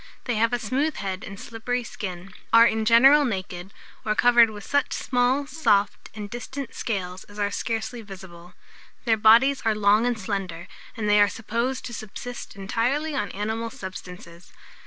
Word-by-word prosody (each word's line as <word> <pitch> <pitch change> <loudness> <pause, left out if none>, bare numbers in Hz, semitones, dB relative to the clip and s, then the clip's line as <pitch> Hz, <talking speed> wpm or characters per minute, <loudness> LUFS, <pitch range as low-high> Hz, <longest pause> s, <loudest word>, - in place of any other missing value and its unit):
They 245 - -1
have 230 +2 +2
a 245 - +1
smooth 270 +7 -1
head 190 -1 -4
and 195 0 -8
slippery 240 +2 -3
skin, 185 -4 -7 0.2
are 230 0 +8
in 220 -1 +1
general 265 +6 +7
naked, 190 -5 -4 0.3
or 215 -1 0
covered 240 -1 +6
with 210 -1 -9
such 285 -1 0
small, 255 +2 +1
soft, 225 -10 0
and 210 -1 -6
distant 250 +4 -7
scales, 185 -4 -4
as 205 - -15
are 205 -1 0
scarcely 225 +3 -3
visible. 180 -4 -12 0.5
Their 225 -2 +4
bodies 235 +6 +5
are 220 -1 +1
long 210 +3 +3
and 245 -2 0
slender, 190 -4 -4 0.3
and 215 -2 -2
they 210 0 +5
are 205 - +5
supposed 235 +5 -3
to 240 - -7
subsist 235 +3 -8
entirely 245 +10 -1
on 240 -8 -2
animal 220 +3 -3
substances. 180 -3 -10
220 Hz, 165 wpm, -25 LUFS, 200-245 Hz, 0.5 s, are